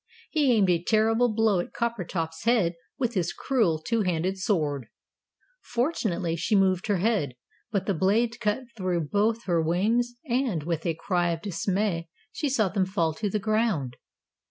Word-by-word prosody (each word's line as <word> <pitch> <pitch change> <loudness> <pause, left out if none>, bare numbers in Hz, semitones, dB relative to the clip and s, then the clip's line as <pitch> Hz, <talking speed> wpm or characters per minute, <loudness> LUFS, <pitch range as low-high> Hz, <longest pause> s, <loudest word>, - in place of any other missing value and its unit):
he 295 -5 +3
aimed 210 -5 +4
a 170 -1 +2
terrible 225 +4 +3
blow 215 -3 +2
at 175 - -4
Coppertop's 180 -8 -3
head 220 -8 +3 0.2
with 245 -3 -1
his 175 -5 0
cruel 220 -12 +1
two 225 +8 -1
handed 180 0 0
sword. 155 - -1 0.7
Fortunately, 215 - -1
she 170 +6 0
moved 190 -2 +2
her 205 - +2
head, 180 - 0 0.4
but 200 -3 0
the 200 - +1
blade 225 +7 +1
cut 215 +3 0
through 185 -4 -1
both 215 +8 0
her 170 -3 +1
wings, 220 +9 +1
and, 240 - 0
with 165 +1 -2
a 165 - 0
cry 175 +1 0
of 165 -1 -3
dismay, 190 -2 -1 0.2
she 295 - -2
saw 225 -6 +2
them 190 0 0
fall 165 -4 0
to 205 +6 -2
the 210 - 0
ground. 210 - 0
195 Hz, 165 wpm, -27 LUFS, 170-225 Hz, 0.7 s, aimed